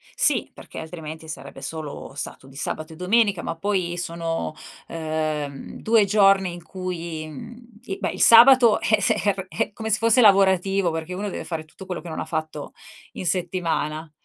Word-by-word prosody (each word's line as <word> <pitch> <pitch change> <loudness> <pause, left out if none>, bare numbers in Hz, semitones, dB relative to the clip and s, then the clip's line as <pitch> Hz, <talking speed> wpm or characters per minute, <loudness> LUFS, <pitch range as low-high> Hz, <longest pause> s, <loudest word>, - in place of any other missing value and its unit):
Sì. - - +2
Perché - - -10
altrimenti 160 -1 -8
sarebbe 155 - -8
solo 155 -4 -6
stato 135 -1 -6
di 135 - -16
sabato 155 +3 -4
e - - -12
domenica. 200 +1 +2
Ma 165 - -3
poi 180 -1 -1
sono, 165 -2 -3 0.3
ehm, 155 -3 -4
2 220 -2 +4
giorni 195 -2 +4
in 175 -1 -10
cui, 170 -4 -5
mhmm, 230 - -12
e 195 -3 -4
beh, - - -1
il - - -5
sabato 235 -1 +8
è 215 -1 +2
ser 195 -1 0
è 225 - -2
come 220 +1 -5
se 215 - +4
fosse 230 +2 +4
lavorativo 195 -3 +4
perché 160 +2 -5
uno 200 +3 -3
deve - - -5
fare 160 -2 -5
tutto 175 +5 -13
quello 180 -2 -5
che 175 - -9
non 160 - -5
ha - - -3
fatto 155 -2 -5 0.4
in - - -6
settimana. 165 -3 -2
175 Hz, 175 wpm, -23 LUFS, 160-200 Hz, 0.4 s, sabato